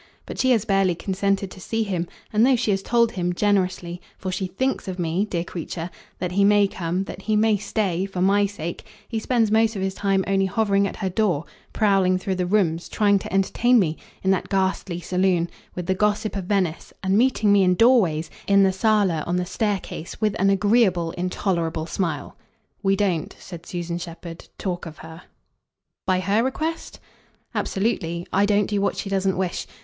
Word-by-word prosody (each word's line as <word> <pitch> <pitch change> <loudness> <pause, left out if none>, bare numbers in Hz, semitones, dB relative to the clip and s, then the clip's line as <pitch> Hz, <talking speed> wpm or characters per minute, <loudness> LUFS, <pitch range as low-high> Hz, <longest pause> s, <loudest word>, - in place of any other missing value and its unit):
But - - -8
she 260 - +3
has 225 -4 +3
barely 195 -4 +2
consented 195 +2 -1
to 185 - -11
see 225 +4 -1
him, 180 -5 -2 0.3
and, 215 +1 +4
though 260 +1 +5
she 230 -3 0
has 195 -1 0
told 235 +1 +2
him, 180 -3 -1
generously 185 -3 0 0.2
for 185 - -4
she 185 +1 -2
THINKS 260 +7 -2
of 185 -1 -4
me, 175 +3 0
dear 175 -5 -2
creature 170 0 -6 0.3
that 180 -1 -3
he 200 +2 +2
may 205 0 +5
come, 180 0 -2
that 195 - -8
he 215 +2 0
may 215 0 +4
stay, 195 -3 -1
for 190 -2 -6
my 200 +2 +3
sake, 170 -4 -6 0.2
he 225 - -2
spends 225 -1 +1
most 220 0 +3
of 190 - -2
his 190 0 -1
time 195 -1 +1
only 195 -1 +2
hovering 200 0 +2
at - - -6
her 190 - -2
door, 180 -6 +1 0.3
prowling 195 -4 +3
through 190 +1 -2
the 180 -1 -1
rooms, 175 -4 +1
trying 205 -2 +3
to - - -8
entertain 230 +6 +3
me, 165 -7 +2 0.3
in 190 - +3
that 190 - 0
ghastly 190 -2 0
saloon, 180 -1 +1 0.3
with 180 - -4
the 190 - +1
gossip 210 +2 0
of 195 -2 -3
Venice, 185 -4 -1
and 190 +1 +2
meeting 220 -3 +3
me, 200 - +5
in 180 0 +3
doorways, 190 -9 +3 0.2
in 200 0 +5
the 190 -1 +3
sala, 190 -5 +2
on 175 - 0
the 180 0 0
staircase, 195 -3 -3
with 215 -1 +1
an 195 - +4
agreeable 195 -4 +3
intolerable 170 -3 -2
smile. 170 0 -3 0.5
We 195 -1 +2
don't," 185 -6 -1
said 175 -2 -10
Susan 175 -1 -4
Shepherd, 170 -1 -9
"talk 180 -3 -3
of 155 - -10
her." 160 +1 -10 0.9
"By 185 -1 +2
her 200 +4 +2
request?" 315 +5 -3 0.5
"Absolutely. 175 -5 -1
I 200 +2 +3
don't 205 0 +3
do 205 0 -1
what 200 - 0
she - - -4
doesn't 195 -1 0
wish. 185 -2 -2
195 Hz, 195 wpm, -23 LUFS, 180-205 Hz, 0.9 s, though